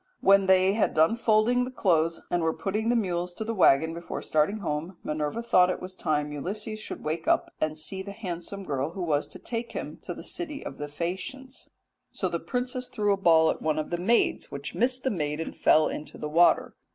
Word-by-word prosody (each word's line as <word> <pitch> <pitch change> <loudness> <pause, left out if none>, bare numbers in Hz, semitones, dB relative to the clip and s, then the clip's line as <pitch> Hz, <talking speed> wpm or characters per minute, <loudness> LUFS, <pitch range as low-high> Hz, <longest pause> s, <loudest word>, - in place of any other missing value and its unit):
"When 195 0 +5
they 190 +1 +5
had 215 - +1
done 160 +8 +4
folding 230 +2 +3
the 250 - -4
clothes 165 -9 +1
and 175 - +1
were 160 0 0
putting 215 +3 -1
the 240 - +3
mules 180 -5 -1
to 220 - -4
the 225 +1 -3
waggon 160 -5 +4
before 170 +1 -6
starting 155 +7 +1
home 150 -6 -2
again, 180 0 -14
Minerva 150 +9 -2
thought 185 -6 +4
it 185 - -2
was 185 +1 -7
time 150 -5 -1
Ulysses 210 +9 -4
should - - -7
wake 160 +2 -3
up - - +2
and 155 0 0
see 190 +4 -3
the 200 +1 -7
handsome 195 -1 -6
girl 140 -1 -2
who 185 - -4
was 150 -3 0
to - - -11
take 235 0 -5
him - - -6
to - - -6
the - - -9
city 305 -5 -5
of - - -7
the 145 - -4
Phaeacians. 190 - -6 0.4
So - - -1
the - - -2
princess 250 0 -2
threw 205 -3 +1
a - - +2
ball 165 -4 +5
at - - -6
one 155 -1 0
of 155 - -3
the 175 - 0
maids, 230 +6 +2
which 140 0 -6
missed 250 +2 +1
the 265 - +1
maid 150 -5 -2
and 165 - -5
fell 155 0 +4
into 150 - -6
the 150 - -5
water. 170 +3 +4
185 Hz, 225 wpm, -27 LUFS, 155-220 Hz, 0.4 s, When